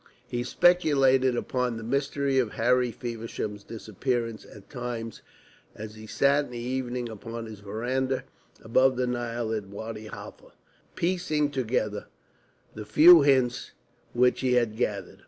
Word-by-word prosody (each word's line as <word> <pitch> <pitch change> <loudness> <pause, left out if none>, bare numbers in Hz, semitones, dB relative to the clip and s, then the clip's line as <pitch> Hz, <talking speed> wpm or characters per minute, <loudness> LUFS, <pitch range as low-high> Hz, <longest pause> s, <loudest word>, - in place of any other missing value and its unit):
He 120 - -3
speculated 135 -7 +3
upon 125 -1 -1
the 115 - -7
mystery 140 +2 0
of 120 -5 -1
Harry 125 +1 +2
Feversham's 115 -3 -5
disappearance 115 +2 -3
at 105 -2 -14
times 120 -3 -6 0.5
as 105 0 -8
he 110 0 -11
sat 140 +5 +2
in - - -13
the 120 - -7
evening 125 0 -3
upon 115 +1 -7
his 110 -2 -9
verandah 125 +6 -2 0.4
above 130 +3 +3
the 125 - +1
Nile 120 -2 -2
at 105 -3 -3
Wadi 110 +2 -7
Halfa, - - -11 0.4
piecing 165 -5 0
together 110 -5 -2 0.7
the 110 - -7
few 155 +11 +8
hints 130 -3 +2 0.4
which 125 +1 +3
he 130 -1 +1
had 120 -3 +2
gathered. 105 -5 -3
120 Hz, 135 wpm, -27 LUFS, 110-130 Hz, 0.7 s, few